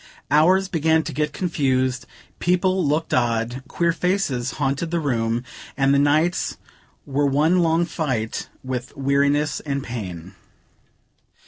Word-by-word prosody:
Hours 180 Hz, +6 st, +4 dB
began 160 Hz, -2 st, +2 dB
to -, -, -5 dB
get 150 Hz, 0 st, -1 dB
confused; 135 Hz, -7 st, 0 dB, 0.3 s
people 185 Hz, +1 st, +2 dB
looked 150 Hz, +2 st, 0 dB
odd; 120 Hz, +1 st, 0 dB
queer 170 Hz, -1 st, +1 dB
faces 165 Hz, -9 st, -1 dB
haunted 140 Hz, +5 st, -1 dB
the 170 Hz, +1 st, 0 dB
room, 120 Hz, -5 st, -1 dB, 0.3 s
and 135 Hz, 0 st, +3 dB
the 140 Hz, -, +4 dB
nights 155 Hz, +5 st, +1 dB, 0.5 s
were 140 Hz, +1 st, +1 dB
one 155 Hz, +6 st, +3 dB
long 165 Hz, 0 st, +2 dB
fight 130 Hz, -10 st, -3 dB
with 130 Hz, +1 st, -5 dB
weariness 140 Hz, +2 st, +1 dB
and 140 Hz, -2 st, -3 dB
pain. 95 Hz, -8 st, -6 dB
145 Hz, 125 wpm, -22 LUFS, 130-165 Hz, 0.5 s, Hours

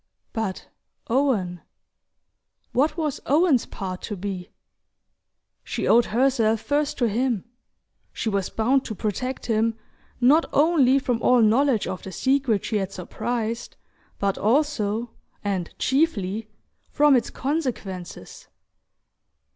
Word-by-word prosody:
But 220 Hz, -5 st, -3 dB, 0.4 s
Owen? 215 Hz, -, +1 dB, 1.1 s
What 300 Hz, +5 st, +1 dB
was 305 Hz, -4 st, -2 dB
Owen's 295 Hz, -3 st, +3 dB
part 185 Hz, -2 st, -6 dB
to 210 Hz, -, -5 dB
be? 185 Hz, -1 st, -5 dB, 1.1 s
She -, -, -3 dB
owed 235 Hz, +1 st, +5 dB
herself 230 Hz, -2 st, +2 dB
first 290 Hz, +5 st, -1 dB
to 240 Hz, -, +2 dB
him 230 Hz, -1 st, 0 dB, 0.7 s
she -, -, -4 dB
was 200 Hz, -3 st, 0 dB
bound 255 Hz, +4 st, +2 dB
to 220 Hz, -, -5 dB
protect 240 Hz, +6 st, -3 dB
him 225 Hz, 0 st, +1 dB, 0.4 s
not 285 Hz, +7 st, +5 dB
only 285 Hz, -4 st, +4 dB
from 245 Hz, -4 st, -1 dB
all 250 Hz, -2 st, +5 dB
knowledge 235 Hz, +1 st, +3 dB
of 185 Hz, -, -4 dB
the 190 Hz, -, -8 dB
secret 260 Hz, -2 st, +1 dB
she 215 Hz, -, 0 dB
had 195 Hz, -1 st, -2 dB
surprised, 230 Hz, +5 st, -4 dB, 0.4 s
but 200 Hz, -1 st, -1 dB
also 235 Hz, -3 st, +1 dB, 0.3 s
and 190 Hz, -4 st, -2 dB
chiefly! 225 Hz, -, 0 dB, 0.4 s
from 295 Hz, -1 st, +4 dB
its 245 Hz, -, +1 dB
consequences. 250 Hz, -, -4 dB
230 Hz, 115 wpm, -24 LUFS, 205-270 Hz, 1.1 s, owed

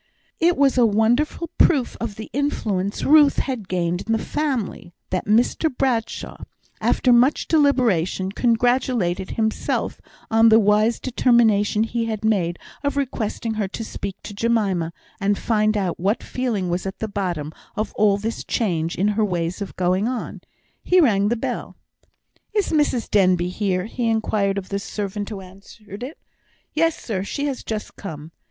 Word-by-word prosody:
It 340 Hz, +1 st, +3 dB
was 275 Hz, -2 st, +3 dB
a -, -, +6 dB
wonderful 240 Hz, +10 st, +1 dB
proof 275 Hz, -8 st, +3 dB
of 225 Hz, -3 st, -3 dB
the 220 Hz, -, -9 dB
influence 210 Hz, -9 st, -1 dB
Ruth 295 Hz, -1 st, +6 dB
had 250 Hz, -8 st, -2 dB
gained 175 Hz, 0 st, -1 dB
in 225 Hz, -, +1 dB
the -, -, +3 dB
family, 255 Hz, -, -3 dB, 0.2 s
that 185 Hz, +1 st, -2 dB
Mr 235 Hz, +9 st, +2 dB
Bradshaw, 240 Hz, -4 st, -1 dB, 0.4 s
after 250 Hz, -, +3 dB
much 250 Hz, +5 st, +3 dB
deliberation, 235 Hz, -, +2 dB
congratulated 235 Hz, -5 st, +1 dB
himself 220 Hz, -1 st, -1 dB, 0.3 s
on 225 Hz, +1 st, +6 dB
the 220 Hz, -, +7 dB
wise 215 Hz, +2 st, +3 dB
determination 225 Hz, -4 st, +3 dB
he 230 Hz, +1 st, -2 dB
had 220 Hz, -1 st, -3 dB
made 180 Hz, -6 st, +1 dB, 0.3 s
of 285 Hz, 0 st, -1 dB
requesting 230 Hz, -4 st, -2 dB
her 215 Hz, -2 st, -1 dB
to 215 Hz, +4 st, -6 dB
speak 200 Hz, -3 st, -5 dB
to -, -, -7 dB
Jemima, 200 Hz, -6 st, 0 dB, 0.3 s
and 200 Hz, 0 st, +1 dB
find 215 Hz, -1 st, +1 dB
out 185 Hz, -4 st, -2 dB
what 200 Hz, +6 st, 0 dB
feeling 235 Hz, -8 st, -2 dB
was 175 Hz, +2 st, -2 dB
at 190 Hz, -, -5 dB
the 220 Hz, -, -3 dB
bottom 175 Hz, -7 st, -3 dB, 0.2 s
of 215 Hz, 0 st, -3 dB
all 205 Hz, -1 st, +3 dB
this 220 Hz, +3 st, -4 dB
change 170 Hz, -7 st, -1 dB
in 200 Hz, +3 st, +1 dB
her 215 Hz, +1 st, +1 dB
ways 175 Hz, -1 st, -2 dB
of 200 Hz, -, -5 dB
going 185 Hz, +3 st, +1 dB
on. 250 Hz, -1 st, -4 dB, 0.4 s
He 365 Hz, -, +4 dB
rang 205 Hz, -, +4 dB
the 235 Hz, -, +1 dB
bell. -, -, -4 dB, 0.8 s
"Is 410 Hz, -3 st, +1 dB
Mrs 295 Hz, -7 st, +1 dB
Denbigh 185 Hz, -3 st, +2 dB
here?" 185 Hz, -2 st, -1 dB
he 230 Hz, +1 st, -2 dB
inquired 210 Hz, -3 st, 0 dB
of 190 Hz, -1 st, -5 dB
the 200 Hz, -, -2 dB
servant 205 Hz, -1 st, -4 dB
who 205 Hz, -3 st, -6 dB
answered 200 Hz, +2 st, -13 dB
it. 270 Hz, +7 st, -6 dB, 0.6 s
"Yes, 330 Hz, +1 st, +2 dB
sir; 195 Hz, -5 st, -3 dB
she 285 Hz, +8 st, -3 dB
is 275 Hz, -3 st, -3 dB
just 215 Hz, -1 st, -5 dB
come." 155 Hz, -5 st, -8 dB
215 Hz, 160 wpm, -22 LUFS, 195-245 Hz, 0.8 s, the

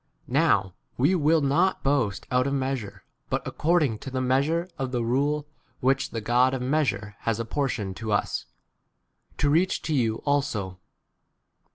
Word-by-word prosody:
* -, -, -43 dB
1 -, -, -10 dB
Now 95 Hz, -2 st, +3 dB, 0.2 s
we 140 Hz, +9 st, +3 dB
will 160 Hz, -2 st, +3 dB
not 160 Hz, +7 st, +2 dB
boast 130 Hz, -8 st, 0 dB
out 125 Hz, +1 st, +2 dB
of 140 Hz, -, 0 dB
measure, 130 Hz, -6 st, -3 dB
e -, -, -45 dB, 0.2 s
but -, -, -1 dB
according 150 Hz, -9 st, +1 dB
to 135 Hz, -, -7 dB
the 130 Hz, 0 st, -2 dB
measure 140 Hz, +7 st, +1 dB
of 130 Hz, -1 st, -2 dB
the 120 Hz, -2 st, -1 dB
rule 145 Hz, +5 st, 0 dB, 0.3 s
which 135 Hz, +1 st, +1 dB
the 115 Hz, -, -4 dB
God 125 Hz, +4 st, +3 dB
of 130 Hz, -, -4 dB
mea 150 Hz, +5 st, +2 dB
sure 100 Hz, -3 st, -2 dB
f 105 Hz, -, -19 dB
has 115 Hz, -1 st, -1 dB
apportioned 115 Hz, -5 st, -2 dB
to 110 Hz, -2 st, -4 dB
us, 100 Hz, -, -1 dB, 0.9 s
to -, -, 0 dB
14 145 Hz, -, +3 dB
reach 180 Hz, +5 st, +2 dB
to 160 Hz, -, -1 dB
you 115 Hz, -6 st, +2 dB
also. 110 Hz, -11 st, -1 dB
130 Hz, 185 wpm, -26 LUFS, 115-145 Hz, 0.9 s, Now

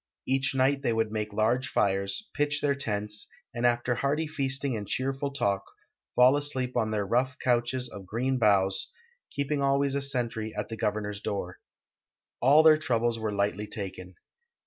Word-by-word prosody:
Each 135 Hz, +1 st, 0 dB
night 135 Hz, +1 st, +2 dB
they 120 Hz, -4 st, +1 dB
would 110 Hz, -1 st, 0 dB
make 105 Hz, -1 st, -3 dB
large 115 Hz, +5 st, +1 dB
fires, 100 Hz, -, 0 dB
pitch 145 Hz, -1 st, 0 dB
tlieir 140 Hz, -1 st, +1 dB
tents, 105 Hz, -3 st, -3 dB, 0.3 s
and 120 Hz, +1 st, +2 dB
after 120 Hz, +1 st, +1 dB
hearty 140 Hz, +6 st, 0 dB
feasting 135 Hz, -3 st, -1 dB
and 105 Hz, -2 st, -5 dB
cheerful 135 Hz, +4 st, -1 dB
talk 100 Hz, -8 st, 0 dB, 0.5 s
fall 125 Hz, +2 st, +6 dB
asleep 130 Hz, -3 st, -1 dB
on 110 Hz, -3 st, +1 dB
their 105 Hz, -2 st, -1 dB
rough 125 Hz, +5 st, 0 dB
couches 125 Hz, +1 st, 0 dB
of 95 Hz, -2 st, -10 dB
green 125 Hz, +5 st, -1 dB
boughs, 95 Hz, -3 st, +2 dB, 0.4 s
keeping 140 Hz, 0 st, -2 dB
always 140 Hz, 0 st, +2 dB
a 140 Hz, -, 0 dB
sentry 120 Hz, -5 st, -2 dB
at 105 Hz, -, -3 dB
the 115 Hz, -, -4 dB
governor's 105 Hz, -1 st, -2 dB
door. 95 Hz, -4 st, -4 dB, 0.8 s
All 145 Hz, +5 st, +6 dB
their 155 Hz, -1 st, +7 dB
troubles 120 Hz, -5 st, 0 dB
were 110 Hz, -1 st, -2 dB
lightl\' 100 Hz, 0 st, -1 dB
taken. 95 Hz, -3 st, -6 dB
120 Hz, 165 wpm, -28 LUFS, 105-135 Hz, 0.8 s, their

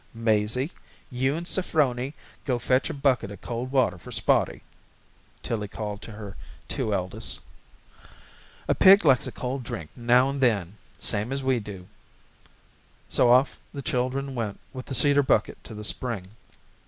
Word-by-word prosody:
"Mazie, 115 Hz, -, +1 dB, 0.4 s
you 130 Hz, +3 st, 0 dB
and 170 Hz, +2 st, -4 dB
Saphroney 145 Hz, -7 st, +1 dB, 0.3 s
go 125 Hz, -3 st, 0 dB
fetch 125 Hz, +2 st, +1 dB
a -, -, -1 dB
bucket 135 Hz, -6 st, +1 dB
of 100 Hz, -2 st, -9 dB
cold 120 Hz, +2 st, -4 dB
water 130 Hz, -9 st, +2 dB
for -, -, -11 dB
Spotty," -, -, +1 dB, 0.8 s
Tillie 105 Hz, -3 st, -2 dB
called 105 Hz, 0 st, -5 dB
to 110 Hz, -, -8 dB
her 105 Hz, -2 st, -8 dB, 0.3 s
two 110 Hz, -, -2 dB
eldest. 100 Hz, +3 st, -2 dB, 1.3 s
"A -, -, +3 dB
pig 195 Hz, -1 st, +7 dB
likes 135 Hz, -4 st, +4 dB
a -, -, -5 dB
cold 130 Hz, +1 st, -4 dB
drink 80 Hz, -10 st, -6 dB
now 125 Hz, +2 st, +4 dB
and 140 Hz, 0 st, -3 dB
then 105 Hz, -7 st, +1 dB, 0.2 s
same 105 Hz, +5 st, -1 dB
as 135 Hz, 0 st, -2 dB
we 130 Hz, -2 st, +2 dB
do." 100 Hz, -4 st, -8 dB, 1.2 s
So 120 Hz, -, +4 dB
off 130 Hz, +3 st, +4 dB, 0.2 s
the 140 Hz, -, -5 dB
children 130 Hz, +2 st, -1 dB
went 115 Hz, -5 st, -3 dB
with 130 Hz, -1 st, -7 dB
the 135 Hz, -, -2 dB
cedar 145 Hz, +3 st, +5 dB
bucket 135 Hz, -, +1 dB
to 110 Hz, -, -9 dB
the 105 Hz, -, -7 dB
spring. 105 Hz, -4 st, -2 dB
125 Hz, 155 wpm, -26 LUFS, 105-135 Hz, 1.3 s, pig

